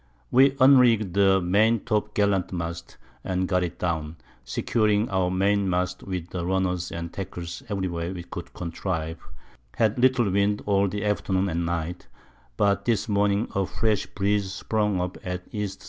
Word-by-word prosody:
We 135 Hz, +2 st, +5 dB
unrigg'd 120 Hz, -8 st, +5 dB
the 95 Hz, -1 st, +4 dB
Main 105 Hz, +5 st, +3 dB
top 105 Hz, -3 st, -1 dB
gallant 100 Hz, -3 st, +1 dB
Mast, 85 Hz, -1 st, -5 dB, 0.3 s
and 95 Hz, 0 st, -1 dB
got 90 Hz, -1 st, +1 dB
it 90 Hz, -1 st, -3 dB
down, 80 Hz, -3 st, -2 dB, 0.3 s
securing 105 Hz, -, +1 dB
our 95 Hz, -2 st, +1 dB
Main 100 Hz, +1 st, +1 dB
mast 90 Hz, 0 st, -1 dB
with 90 Hz, -3 st, -5 dB
Runners 90 Hz, 0 st, -1 dB
and 85 Hz, 0 st, -6 dB
Tackles 85 Hz, -3 st, -6 dB
every 100 Hz, -2 st, -1 dB
way 85 Hz, 0 st, -3 dB
we 90 Hz, -2 st, -6 dB
could -, -, -8 dB
contrive, 85 Hz, -2 st, -4 dB, 0.6 s
had 110 Hz, 0 st, +1 dB
little 125 Hz, -5 st, +3 dB
Wind 100 Hz, +2 st, +1 dB
all 100 Hz, -1 st, +2 dB
the 105 Hz, +2 st, -3 dB
Afternoon 100 Hz, -2 st, 0 dB
and 85 Hz, 0 st, -1 dB
Night, 85 Hz, +1 st, -3 dB, 0.5 s
but 100 Hz, -1 st, +2 dB
this 115 Hz, -3 st, +1 dB
Morning 100 Hz, +1 st, +1 dB
a 95 Hz, -1 st, 0 dB
fresh 110 Hz, -3 st, 0 dB
Breeze 100 Hz, -1 st, 0 dB
sprung 105 Hz, -1 st, -1 dB
up 90 Hz, 0 st, -3 dB
at 90 Hz, 0 st, -4 dB
E.S. 105 Hz, -2 st, -3 dB
95 Hz, 160 wpm, -25 LUFS, 90-105 Hz, 0.6 s, We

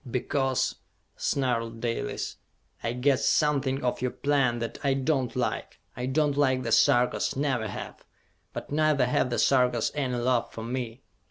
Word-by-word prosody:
"Because," 130 Hz, +1 st, 0 dB, 0.4 s
snarled 115 Hz, -4 st, -1 dB
Dalis, 115 Hz, 0 st, -3 dB, 0.5 s
"I 115 Hz, -, -1 dB
guessed 130 Hz, +2 st, +2 dB
something 140 Hz, -3 st, +1 dB
of 125 Hz, -1 st, -1 dB
your 125 Hz, -, +1 dB
plan 135 Hz, -3 st, +1 dB
that 115 Hz, -1 st, -5 dB
I 135 Hz, -1 st, +2 dB
do 135 Hz, +1 st, +1 dB
not 120 Hz, -, -10 dB
like! -, -, -2 dB, 0.2 s
I 125 Hz, +1 st, -3 dB
do 150 Hz, +4 st, +2 dB
not 145 Hz, -1 st, -1 dB
like 130 Hz, -3 st, +2 dB
the -, -, -3 dB
Sarkas, 125 Hz, -3 st, +3 dB
never 130 Hz, -5 st, 0 dB
have; -, -, -7 dB, 0.5 s
but -, -, -7 dB
neither 150 Hz, -3 st, +3 dB
have 125 Hz, +1 st, +1 dB
the 120 Hz, -, -1 dB
Sarkas 125 Hz, -4 st, +3 dB
any 135 Hz, -4 st, -1 dB
love 120 Hz, 0 st, +1 dB
for 110 Hz, -, -7 dB
me! 120 Hz, +1 st, -4 dB
130 Hz, 165 wpm, -27 LUFS, 120-140 Hz, 0.5 s, Sarkas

